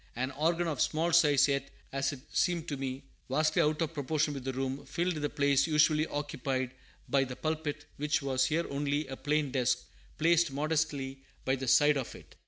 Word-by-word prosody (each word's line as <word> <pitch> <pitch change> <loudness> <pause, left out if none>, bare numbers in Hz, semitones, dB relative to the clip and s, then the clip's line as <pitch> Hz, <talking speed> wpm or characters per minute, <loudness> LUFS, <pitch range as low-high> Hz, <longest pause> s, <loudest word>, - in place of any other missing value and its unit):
An 130 +2 -2
organ 165 +5 0
of 150 -5 -2
small 165 +2 +1
size, 150 -5 +5
yet, 140 -1 -1 0.2
as 135 0 0
it 140 -3 -8
seemed 170 -2 +1
to 145 - -2
me, 135 0 -4 0.3
vastly 155 +5 +2
out 155 +1 +1
of 165 0 -4
proportion 150 0 0
with 135 -2 -6
the 135 - -2
room, 135 +1 -3
filled 175 +4 -1
the 150 -2 -2
place 140 0 +2
usually 155 0 +3
occupied 135 -3 -2 0.4
by 140 -1 +3
the 130 -1 -5
pulpit, 155 -1 -3
which 150 +1 +1
was 130 -2 +1
here 165 +3 0
only 145 +1 -1
a 135 -1 -6
plain 150 0 0
desk, 125 -2 +1 0.3
placed 170 -1 +3
modestly 145 -2 -1 0.3
by 130 - +2
the 135 0 -5
side 145 +3 +5
of 130 - -4
it. - - -14
145 Hz, 190 wpm, -31 LUFS, 135-155 Hz, 0.4 s, size